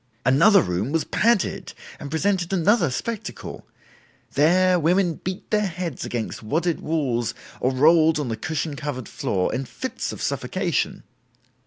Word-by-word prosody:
"Another 170 - +6
room 90 +9 -2
was 165 0 +1
padded 230 -4 +1 0.3
and 145 - -7
presented 180 +3 0
another 190 - +3
spectacle. 220 - -5 0.7
There 180 +5 +4
women 175 +1 +1
beat 185 +1 -5
their 210 -1 +2
heads 170 -5 -4
against 115 -3 -4
wadded 160 +9 -1
walls 125 -8 -1 0.2
or 130 - +1
rolled 155 +3 +4
on 145 - -2
the 115 - -2
cushion 150 +5 -3
covered 140 -5 -5
floor, 90 -2 -1
in 135 +1 -2
fits 255 - -5
of - - -8
suffocation. - - -1
160 Hz, 140 wpm, -23 LUFS, 130-185 Hz, 0.7 s, Another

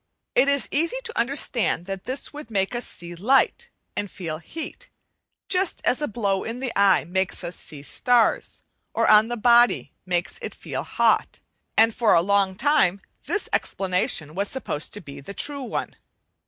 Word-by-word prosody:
It 275 - +4
is 280 -1 +2
easy 335 - +1
to 460 -1 -4
understand 240 - 0
that 195 0 -6
this 260 +3 -3
would 295 -5 -9
make 195 -1 0
us 240 0 -3
see 175 0 -6
light 265 - +2 0.3
and 205 - -3
feel 165 -5 -5
heat, 310 - -8 0.6
just 375 -1 +1
as 255 - +2
a 295 - 0
blow 200 -3 -1
in 230 +2 -5
the 260 -2 -2
eye 195 -5 +4
makes 190 +2 -1
us 175 - -5
see 145 -2 -8
starts, 240 - +1 0.3
or - - +2
on 215 +1 +7
the 240 0 -3
body 240 +1 +4
makes 175 0 -1
it - - -6
feel - - -5
hot: - - +1 0.4
and 225 0 +5
for 225 -1 +3
a 165 - +5
long 200 0 +2
time 210 -6 +3 0.3
this 420 - -1
explanation 180 -5 0
was 200 +3 -1
supposed 200 - -2
to 205 - -7
be 140 -5 -10
the 200 +9 -9
true 285 -1 -2
one. 250 - -4
215 Hz, 175 wpm, -24 LUFS, 185-265 Hz, 0.6 s, on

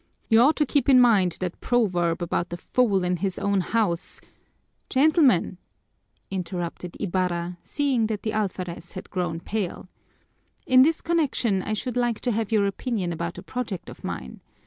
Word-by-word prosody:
You 225 - +6
ought 290 +6 +5
to 300 - +2
keep 280 -1 +1
in 260 -2 +7
mind 205 -8 +4
that 180 -1 -4
proverb 180 -8 +1
about 175 0 -1
the 175 - -5
fool 200 -1 +1
in 180 0 0
his 190 +1 -2
own 200 -1 +1
house 185 -3 -1 0.4
" - - -46
"Gentlemen!" 270 - +3 0.7
interrupted 180 -2 -4
Ibarra, 175 -2 -2
seeing 270 -6 0
that 215 -2 -4
the 220 - -2
alferez 185 -5 -3
had 185 - -9
grown 175 -3 -2
pale. 190 -2 -4 0.8
"In 255 0 +6
this 315 +4 +3
connection 275 - +1
I 215 - -3
should 245 +3 -3
like 240 -2 +1
to 245 - 0
have 220 0 -2
your 210 -2 +3
opinion 200 -3 -2
about 170 +1 -4
a - - -8
project 235 -8 -5
of - - -12
mine. 65 0 -6
200 Hz, 170 wpm, -25 LUFS, 175-245 Hz, 0.8 s, in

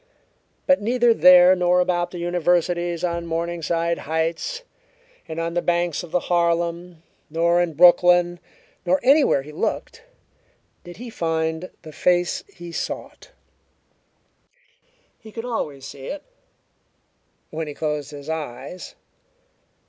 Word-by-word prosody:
But 275 -3 +3
neither 240 +2 +3
there 180 -2 +7
nor 180 0 +2
about 175 -1 0
the 175 - -8
Universities 175 0 0
on 170 -1 -2
Morningside 170 0 -2
Heights 165 - -2 0.6
and 160 0 -5
on 165 0 -2
the 175 - 0
banks 175 -2 0
of 175 - -10
the 180 - 0
Harlem, 170 0 -1 0.3
nor 170 +2 +2
in 175 -2 -1
Brooklyn, 175 +1 +5 0.4
nor 185 +1 +2
anywhere 275 - +4
he 150 - -11
looked, 460 - -3 0.8
did 175 0 -11
he 240 +1 -8
find 160 -1 -2
the 155 - -10
face 175 +2 +1
he 175 -1 -10
sought. 170 - -6 1.9
He 220 - -13
could 225 +2 -6
always 150 - -4
see 135 -1 -9
it 295 - -6 1.3
when 160 0 -4
he 145 - -7
closed 150 -2 -3
his 145 -1 -10
eyes. 155 +1 -6
175 Hz, 125 wpm, -22 LUFS, 160-180 Hz, 1.9 s, there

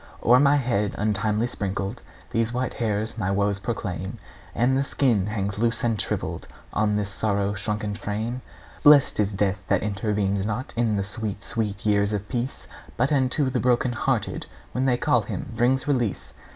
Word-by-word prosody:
O'er 125 +2 +6
my 145 +1 +5
head 115 -7 0
untimely 105 +1 +1
sprinkled 100 -1 -3 0.3
These 115 0 +1
white 125 +1 -2
hairs 110 0 -2
my 100 -3 0
woes 100 0 +1
proclaim, 100 -1 -4 0.4
And 125 +3 +3
the 135 - +2
skin 120 -8 +1
hangs 100 -1 -2
loose 115 +1 +1
and 115 -4 +1
shrivelled - - -3 0.3
On 105 -1 +2
this 105 -1 -1
sorrow 100 -1 0
shrunken 105 0 -2
frame. 110 +5 -3 0.4
Blest 145 -5 +6
is 105 -1 +2
death 100 -1 0
that - - +2
intervenes 100 -1 0
not 110 +5 -3
In 115 -2 +1
the 100 - 0
sweet, 105 0 -4
sweet 105 -4 -3
years 100 0 +2
of 105 0 -3
peace, 125 +2 -3 0.3
But 125 +5 +2
unto 135 0 +2
the 125 - 0
broken 125 0 +2
hearted, 120 -2 -1 0.2
When 130 +1 0
they 125 -2 +3
call - - +3
him, - - -5
brings 130 +4 +2
release! 125 -8 -1
110 Hz, 170 wpm, -25 LUFS, 100-120 Hz, 0.4 s, O'er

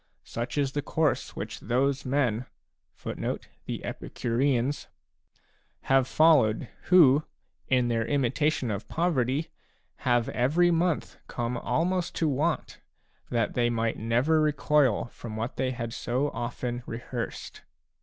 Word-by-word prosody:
Such 120 +5 -5
is 140 -2 +1
the 145 - -1
course 155 0 0
which - - -5
those 135 +4 0
men 125 -3 +1 0.6
a - - -5 1.9
have 135 -1 +3
followed 135 -9 +4 0.2
who, 155 -5 +6 0.4
in 125 -2 +3
their 115 -1 0
imitation 140 -1 +1
of 100 +1 -4
poverty, 150 -3 0 0.5
have 120 -2 +1
every 160 +8 +3
month 170 -1 0
come 120 0 -3
almost 170 +10 -1
to 160 - +1
want, 150 +3 -1 0.5
that 115 -3 0
they 120 -1 +2
might 115 -1 -1
never 125 +8 +2
recoil 150 -5 +2
from 115 -2 -8
what 115 +3 -4
they 130 - 0
had 115 -2 -4
so 130 +4 -1
often 120 0 -4
rehearsed. 120 +1 -5
130 Hz, 115 wpm, -28 LUFS, 120-150 Hz, 1.9 s, who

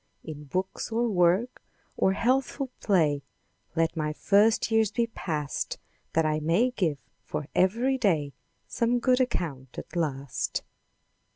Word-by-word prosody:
In 150 -1 -8
books, 185 +9 -3
or 235 +2 +1
work, 190 +4 +2 0.3
or 190 - +2
healthful 260 +4 0
play, 155 -8 +2 0.5
Let 165 0 +1
my 155 -1 -1
first 210 +7 +3
years 225 -2 +4
be 235 +2 +1
passed. 155 -10 -3 0.4
That 160 0 +3
I 155 0 +1
may 170 +11 +2
give 170 - 0 0.3
for 150 - -4
ev'ry 235 +8 +2
day 160 - +1 0.3
Some 240 +1 +1
good 250 +1 +3
account 145 - -3
at - - -8
last. 140 -6 -2
185 Hz, 130 wpm, -27 LUFS, 155-235 Hz, 0.5 s, years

